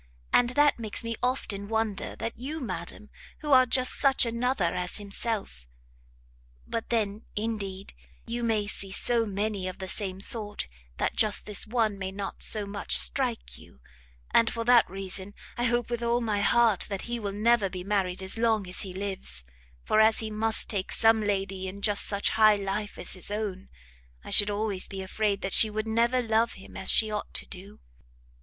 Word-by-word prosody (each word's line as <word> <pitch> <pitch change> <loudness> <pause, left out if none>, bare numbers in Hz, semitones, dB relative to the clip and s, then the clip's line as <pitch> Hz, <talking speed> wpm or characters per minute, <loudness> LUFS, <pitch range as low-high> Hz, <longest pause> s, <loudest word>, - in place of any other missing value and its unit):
and 245 -1 +5
that 290 -3 +4
makes 220 -1 -2
me 230 0 -3
often 210 -6 -1
wonder 220 -2 -1
that 230 - -4
you, 295 +6 -5
madam, 210 - -6 0.3
who 295 - -3
are 255 -1 +7
just 255 +1 +3
such 270 -2 +4
another 235 -6 0
as 180 -1 -1
himself 200 - -4 1.0
but 230 - -4
then, 215 -2 -1
indeed, 205 -3 -4 0.3
you 235 +1 -4
may 220 -3 +1
see 200 -1 -4
so 230 +3 +2
many 200 -1 -2
of 185 - -6
the 190 - -6
same 190 -1 -1
sort, 210 0 -1 0.3
that - - -1
just 215 -2 +2
this 210 0 -2
one 220 -3 0
may 190 -1 -3
not 195 0 -6
so 210 -2 +2
much 200 0 0
strike - - 0
you: 65 - -17 0.5
and 230 - +4
for 230 - -3
that 240 0 +5
reason 195 +1 -4 0.2
I 240 - -1
hope 240 0 0
with 240 -1 -2
all 235 0 +1
my 215 -4 -1
heart 230 -2 +3
that 195 -2 -4
he 240 0 -3
will 205 -2 -3
never 215 0 +2
be 180 -1 -6
married 190 -2 -1
as 190 +4 +1
long 220 -4 +1
as 180 - -4
he 190 -3 -4
lives, 185 - -3 0.4
for 215 - +2
as 220 0 +5
he 220 -1 -3
must 220 +1 0
take 195 -3 -2
some 225 0 +4
lady 195 -2 -2
in 200 +2 -8
just 205 -2 +4
such 200 -1 +1
high 215 -1 +5
life 205 +1 -4
as - - -1
his 185 - -5
own, 205 -3 -4 0.5
I - - -9
should 205 0 +7
always 205 -2 0
be 190 -1 -6
afraid 200 +1 -1
that 195 - -2
she 220 - +5
would 215 +1 -3
never 235 +3 +1
love 225 0 +1
him 195 - -13
as 190 - -3
she 220 -1 +3
ought 210 - -5
to - - -3
do!" 195 +2 -11
210 Hz, 190 wpm, -27 LUFS, 195-230 Hz, 1.0 s, are